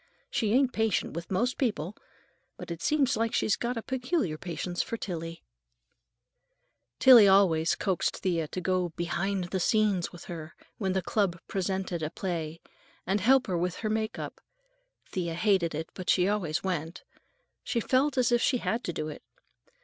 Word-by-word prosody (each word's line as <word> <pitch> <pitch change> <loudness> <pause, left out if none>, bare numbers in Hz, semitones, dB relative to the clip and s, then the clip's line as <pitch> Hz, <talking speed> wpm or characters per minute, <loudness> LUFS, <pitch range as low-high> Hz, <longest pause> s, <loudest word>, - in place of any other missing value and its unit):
"She 215 -4 0
ain't 260 0 +3
patient 220 -3 0
with 170 0 -6
most 240 +7 0
people, 210 - -1 0.6
but - - -8
it 170 -1 -5
seems 280 - +2
like 225 +1 0
she's 210 - +2
got 240 0 -3
a 225 - -4
peculiar 255 - -1
patience 175 +2 -3
for 230 - -4
Tillie." 165 -5 -5 1.5
Tillie 240 -6 +9
always 180 -5 +4
coaxed 190 -4 -1
Thea 170 -4 -1
to 185 - -5
go 185 -1 0
"behind 175 +2 -2
the 190 - 0
scenes" 205 -3 +2
with 175 - -11
her 160 -2 -8 0.2
when 190 -3 0
the 190 -1 0
club 195 -5 0
presented 190 -2 -2
a 155 - -1
play, 165 -3 -4 0.5
and 195 +2 0
help 260 +5 +5
her 180 -5 -1
with 180 0 -1
her 215 - +1
make 220 0 -1
up. - - -7 0.7
Thea 170 -3 -2
hated 180 -4 +2
it, 160 +1 -5
but 185 -2 -6
she 180 0 +4
always 185 -7 -1
went. 170 -3 -3 0.6
She 235 - -1
felt 265 +4 +1
as 245 -2 +3
if 240 0 +3
she 260 - +3
had 235 0 -2
to 175 - -2
do 155 - -3
it. 155 - -7
190 Hz, 170 wpm, -29 LUFS, 170-225 Hz, 1.5 s, Tillie